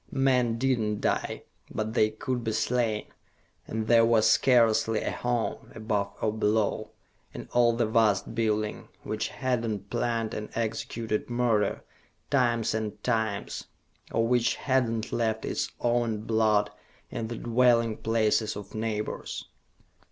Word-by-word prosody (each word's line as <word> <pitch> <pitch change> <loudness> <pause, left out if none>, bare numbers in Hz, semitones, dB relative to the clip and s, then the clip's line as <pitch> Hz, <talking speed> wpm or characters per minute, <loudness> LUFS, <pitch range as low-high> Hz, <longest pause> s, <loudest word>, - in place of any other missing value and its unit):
Men 125 -4 +2
did 130 0 +1
not 105 -1 -1
die, - - -1 0.3
but 110 0 -3
they 110 -2 +3
could 120 +3 -3
be 110 -1 -1
slain, 115 -2 0 0.6
and 110 0 -2
there 115 0 +5
was 115 -1 +4
scarcely 115 -3 +4
a - - -1
home, 120 -2 -2
above 105 -3 -1
or 105 - 0
below, 110 0 0 0.5
in - - -7
all 120 -1 +4
the 120 0 +1
vast 110 -2 +2
building, 110 -2 -1 0.2
which 110 0 -2
had 125 -3 -1
not 105 -3 -4
planned 115 -2 -1
and 105 0 -5
executed 115 0 -2
murder, 120 -4 +1 0.5
times 120 -5 +2
and 105 -1 -4
times 110 -4 -1 0.4
or 115 0 +1
which 120 -1 +2
had 130 -3 +1
not 115 -1 -3
left 110 -1 0
its - - -2
own 120 -3 0
blood 110 -2 +2 0.4
in 115 - -3
the 120 0 -5
dwelling 115 -1 +3
places 110 -1 +1
of 100 -1 -8
neighbors. 110 -1 -3
115 Hz, 140 wpm, -28 LUFS, 110-120 Hz, 0.6 s, there